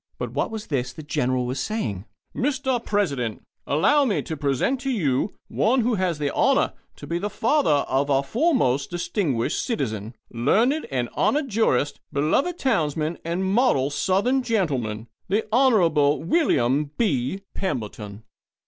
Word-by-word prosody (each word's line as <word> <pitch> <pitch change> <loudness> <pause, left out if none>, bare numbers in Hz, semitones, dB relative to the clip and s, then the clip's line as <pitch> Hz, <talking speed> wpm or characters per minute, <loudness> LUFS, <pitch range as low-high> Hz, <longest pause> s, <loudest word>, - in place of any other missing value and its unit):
But - - -4
what - - -1
was 220 -1 -6
this 125 -4 -2
the 155 - -9
General 130 -3 0
was 130 +2 -3
saying? 110 - -3 0.3
"Mr. 260 -2 0
President, 140 - -1 0.2
allow 285 - +3
me 225 -7 0
to 160 - -5
present 145 - 0
to 270 - -2
you 170 - 0
one 250 +4 +2
who 240 +1 +1
has 185 -5 0
the 145 -1 -2
honour 275 +2 +2 0.2
to - - -10
be 170 +1 -2
the 205 +3 -2
father 220 - +2
of 135 +2 0
our 135 0 +3
foremost, 145 - +1
distinguished 175 - -1
citizen, 115 - -3 0.2
learned 230 - +1
and 125 -3 -1
honoured 285 -2 0
jurist, 145 - +1
beloved 265 - +1
townsman, 160 - 0
and 170 +3 -2
model 190 - +2
Southern 205 - +1
gentleman 135 - -1 0.2
the 210 +4 0
Honourable 170 - +3
William 150 - +2
B. 185 - 0
Pemberton." 105 - -4
170 Hz, 145 wpm, -24 LUFS, -, 0.3 s, allow